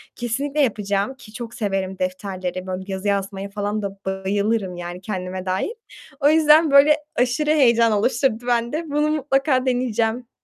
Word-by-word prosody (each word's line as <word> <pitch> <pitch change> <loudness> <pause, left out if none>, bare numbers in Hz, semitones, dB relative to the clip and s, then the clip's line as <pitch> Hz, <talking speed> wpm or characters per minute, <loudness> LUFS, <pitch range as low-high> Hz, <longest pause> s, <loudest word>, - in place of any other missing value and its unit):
kesinlikle 275 +5 -1
yapacağım, 205 -2 0
ki 215 -5 -15
çok 235 -1 -7
severim 195 -4 -2
defterleri, 185 0 -4
böyle 185 0 -4
yazı 190 +1 -4
yazmaya 200 0 -2
falan 205 +1 -3
da 200 -1 -3
bayılırım, 190 0 -1
yani, 175 +1 -7
kendime 185 -2 -4
dair. 185 - -1 0.7
O 290 +1 +4
yüzden 310 0 +5
böyle 290 +2 +7 0.2
aşırı 250 +5 +1
heyecan 235 -6 +4
oluşturdu 235 +2 0
bende. 240 +7 0
Bunu 300 +1 +1
mutlaka 270 -3 +1
deneyeceğim. 245 -1 -1
225 Hz, 145 wpm, -22 LUFS, 195-265 Hz, 0.7 s, böyle